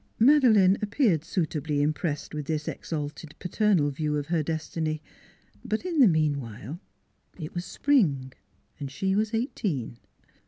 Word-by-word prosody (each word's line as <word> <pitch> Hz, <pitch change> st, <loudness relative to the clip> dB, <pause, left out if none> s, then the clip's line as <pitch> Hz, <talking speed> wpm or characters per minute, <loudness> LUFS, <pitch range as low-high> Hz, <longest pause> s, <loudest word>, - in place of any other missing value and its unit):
Madeleine 225 Hz, -7 st, +5 dB
appeared 205 Hz, -, +2 dB
suitably 155 Hz, -4 st, -1 dB
impressed 150 Hz, +1 st, -1 dB
with 150 Hz, -2 st, -4 dB
this 155 Hz, -2 st, -2 dB
exalted 150 Hz, 0 st, -5 dB
paternal 180 Hz, -5 st, +2 dB
view 150 Hz, +1 st, -1 dB
of 145 Hz, -, -2 dB
her 165 Hz, +1 st, 0 dB
destiny; 155 Hz, 0 st, -2 dB, 0.6 s
but 215 Hz, +10 st, -2 dB
in 340 Hz, -4 st, -1 dB
the 255 Hz, -, +8 dB
meanwhile 145 Hz, -, -1 dB, 0.6 s
it 155 Hz, -4 st, -7 dB
was 175 Hz, 0 st, -4 dB
spring, 145 Hz, -, +1 dB, 0.5 s
and 140 Hz, -2 st, -4 dB
she 190 Hz, +7 st, -1 dB
was 215 Hz, +1 st, +1 dB
eighteen. 190 Hz, -, -2 dB
160 Hz, 130 wpm, -27 LUFS, 145-205 Hz, 0.6 s, the